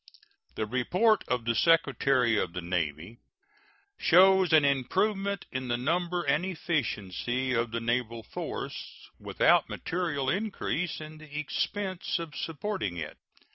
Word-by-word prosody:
The 110 Hz, -, -1 dB
report 180 Hz, -, +2 dB
of 125 Hz, -2 st, -1 dB
the 115 Hz, -, +2 dB
Secretary 135 Hz, -4 st, +3 dB
of 90 Hz, -5 st, -1 dB
the 90 Hz, -, -4 dB
Navy 85 Hz, -, -3 dB, 0.8 s
shows 190 Hz, 0 st, +5 dB
an 155 Hz, -2 st, +6 dB
improvement 195 Hz, -, 0 dB
in 130 Hz, -1 st, -3 dB
the 120 Hz, -1 st, 0 dB
number 175 Hz, +6 st, 0 dB
and 145 Hz, +4 st, +1 dB
efficiency 130 Hz, -, -2 dB
of 115 Hz, 0 st, +1 dB
the 115 Hz, +1 st, -3 dB
naval 115 Hz, -1 st, -1 dB
force, -, -, -7 dB
without -, -, +3 dB
material 165 Hz, -6 st, -2 dB
increase 180 Hz, -2 st, -1 dB
in 155 Hz, 0 st, -9 dB
the 150 Hz, -1 st, -9 dB
expense 185 Hz, +6 st, -2 dB
of 165 Hz, -3 st, -6 dB
supporting 165 Hz, -, -3 dB
it. 80 Hz, -2 st, -6 dB
140 Hz, 130 wpm, -29 LUFS, 115-175 Hz, 0.8 s, an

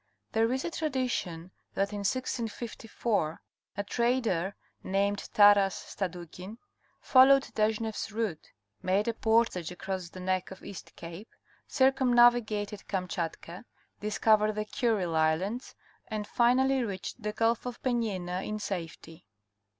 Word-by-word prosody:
There 225 Hz, +1 st, +2 dB
is 260 Hz, +1 st, -1 dB
a 340 Hz, -, -2 dB
tradition 250 Hz, -, -2 dB, 0.2 s
that 200 Hz, +1 st, 0 dB
in 205 Hz, -, -3 dB
1654 225 Hz, -5 st, -2 dB, 0.4 s
a 200 Hz, -, -1 dB
trader 225 Hz, -5 st, 0 dB, 0.3 s
named 200 Hz, +1 st, -1 dB
Taras 205 Hz, -2 st, +6 dB
Stadu 180 Hz, -3 st, -5 dB
kin 190 Hz, +5 st, -9 dB, 0.4 s
followed 270 Hz, +1 st, +6 dB
Deshneff's 220 Hz, 0 st, -1 dB
route, 210 Hz, -7 st, -3 dB, 0.3 s
made 195 Hz, +4 st, +1 dB
a 230 Hz, -, +1 dB
portage 225 Hz, -7 st, +1 dB
across 185 Hz, 0 st, -5 dB
the 185 Hz, -, -10 dB
neck 185 Hz, 0 st, -1 dB
of 190 Hz, -, -11 dB
East 195 Hz, -, -10 dB
Cape, 170 Hz, +6 st, -9 dB, 0.4 s
circumnavigated 240 Hz, -6 st, +3 dB
Kamchatka, 180 Hz, -1 st, -4 dB, 0.4 s
discovered 215 Hz, 0 st, +3 dB
the 215 Hz, 0 st, -2 dB
Kurile 210 Hz, -8 st, 0 dB
Islands, 170 Hz, +10 st, 0 dB, 0.3 s
and 215 Hz, -1 st, -3 dB
finally 255 Hz, +3 st, +3 dB
reached 200 Hz, +2 st, -5 dB
the 210 Hz, 0 st, -2 dB
Gulf 230 Hz, +2 st, +1 dB
of 245 Hz, -1 st, -6 dB
Penjina 195 Hz, -8 st, -1 dB
in 215 Hz, -, -3 dB
safety. 165 Hz, -, -6 dB
210 Hz, 120 wpm, -29 LUFS, 185-235 Hz, 0.4 s, Taras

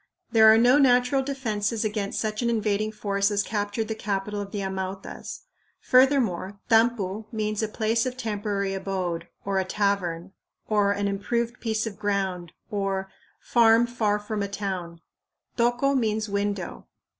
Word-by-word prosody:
There 220 Hz, -2 st, +8 dB
are 220 Hz, -, +6 dB
no 245 Hz, +5 st, +5 dB
natural 250 Hz, 0 st, +4 dB
defenses 230 Hz, -5 st, -2 dB
against 210 Hz, -2 st, -2 dB
such 215 Hz, 0 st, -2 dB
an 235 Hz, -, +1 dB
invading 215 Hz, -1 st, 0 dB
force 200 Hz, -1 st, 0 dB
as 205 Hz, -1 st, +1 dB
captured 205 Hz, +1 st, -2 dB
the 220 Hz, -, -2 dB
capital 205 Hz, -1 st, -3 dB
of 200 Hz, -, -6 dB
the 205 Hz, -, -3 dB
Amautas. 190 Hz, 0 st, -5 dB, 0.4 s
Furthermore, 255 Hz, -8 st, +3 dB
tampu 225 Hz, -3 st, +2 dB
means 215 Hz, -1 st, -2 dB
"a 220 Hz, -, 0 dB
place 225 Hz, +2 st, 0 dB
of 255 Hz, 0 st, -5 dB
temporary 205 Hz, -4 st, -2 dB
abode," 185 Hz, -3 st, -3 dB, 0.2 s
or 195 Hz, -1 st, +1 dB
"a -, -, +1 dB
tavern," 190 Hz, -3 st, -1 dB, 0.4 s
or 205 Hz, -2 st, +2 dB
"an 200 Hz, 0 st, 0 dB
improved 235 Hz, +4 st, -2 dB
piece 220 Hz, -1 st, -1 dB
of 215 Hz, -3 st, -6 dB
ground" 190 Hz, -5 st, -1 dB, 0.2 s
or 195 Hz, -2 st, -2 dB, 0.3 s
"farm 230 Hz, -1 st, +4 dB
far 225 Hz, -4 st, 0 dB
from 210 Hz, 0 st, -4 dB
a 200 Hz, -, -1 dB
town"; 185 Hz, -4 st, -5 dB, 0.5 s
tocco 245 Hz, +3 st, +2 dB
means 220 Hz, -3 st, 0 dB
"window." 200 Hz, -2 st, -3 dB
210 Hz, 150 wpm, -26 LUFS, 200-225 Hz, 0.5 s, There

